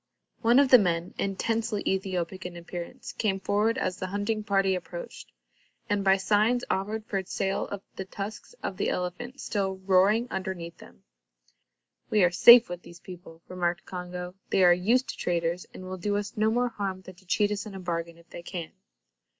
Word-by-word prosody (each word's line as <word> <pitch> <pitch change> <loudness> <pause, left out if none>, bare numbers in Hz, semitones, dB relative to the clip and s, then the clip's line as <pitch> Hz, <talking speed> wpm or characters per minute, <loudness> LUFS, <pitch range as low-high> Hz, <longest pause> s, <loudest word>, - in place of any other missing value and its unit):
One 235 +2 +5
of 280 -1 +5
the 255 - +9
men, 175 -3 0
intensely 220 +2 -1
Ethiopic 190 -1 -2
in 180 -1 -7
appearance, 170 0 -7
came 195 -3 0
forward 210 +4 +1
as 185 - -1
the 185 - -3
hunting 205 +3 -2
party 195 -2 +2
approached, - - -7 0.6
and 205 -1 +1
by 195 0 +5
signs 215 +5 +2
offered 210 +3 -2
for 195 -2 -2
sale 195 +1 -2 0.3
the 190 - -5
tusks 205 - -7
of 190 - -3
the - - 0
elephant 240 +9 -4
still 195 -2 -2
roaring 200 +5 +4
underneath 180 -3 -4
them. 65 - -16 1.1
"We 210 -3 +4
are 175 - +4
safe 235 +6 +9
with 175 0 -6
these 175 -1 -13
people," 175 -2 -12
remarked 175 0 -2
Congo. 180 0 -6 0.2
"They 190 - +3
are 175 -1 +8
used 225 +9 +2
to - - -5
traders, 170 0 -1
and - - -10
will 185 0 -6
do 205 +3 -1
us 205 +3 -4
no 215 0 +2
more 245 +2 +1
harm 195 -4 -4
than 185 - -11
to 185 +1 -22
cheat 205 +2 +2
us 205 +1 -3
in 200 - -9
a - - -6
bargain, 170 -2 -4
if 170 0 -20
they - - -8
can." 170 -2 -6
190 Hz, 185 wpm, -27 LUFS, 180-210 Hz, 1.1 s, the